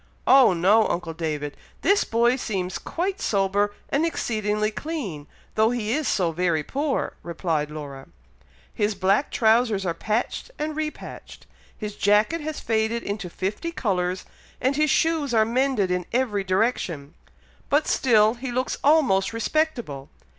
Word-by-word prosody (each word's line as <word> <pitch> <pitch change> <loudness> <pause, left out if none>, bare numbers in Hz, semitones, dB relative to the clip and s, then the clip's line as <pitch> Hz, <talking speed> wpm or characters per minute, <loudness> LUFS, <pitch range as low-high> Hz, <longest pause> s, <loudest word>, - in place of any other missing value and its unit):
"Oh 265 -7 +7
no! 200 +6 +4
uncle 170 -1 -3
David! 150 -3 -3 0.3
this 400 +1 +4
boy 235 +2 +2
seems 190 -8 -3
quite 380 +3 -3
sober 200 0 +1 0.2
and 285 +3 +1
exceedingly 215 -9 -1
clean, 215 - -5 0.3
though 220 +1 +3
he 230 -3 -2
is 305 +1 -1
so 175 -4 +1
very 165 -2 0
poor!" 280 - -2
replied 165 -3 -2
Laura; 145 -3 -8 0.7
"his 210 0 0
black 195 +8 +2
trowsers 220 -3 +2
are 170 - 0
patched 220 - -2
and 305 0 -3
repatched, 310 0 -6 0.3
his 210 -2 -5
jacket 210 +12 +2
has 310 0 -4
faded 225 +1 0
into 200 -3 -4
fifty 210 - -3
colours, 185 - -1 0.3
and 265 +2 +1
his 305 +1 +2
shoes 305 -5 +1
are 220 -1 +5
mended 240 -5 +1
in 180 -1 -1
every 230 -5 0
direction, 185 - -1 0.6
but 290 +2 +3
still 220 -4 +4
he 250 +1 -6
looks 255 +1 -2
almost 265 -11 +3
respectable. 230 - -1
215 Hz, 140 wpm, -24 LUFS, 185-265 Hz, 0.7 s, Oh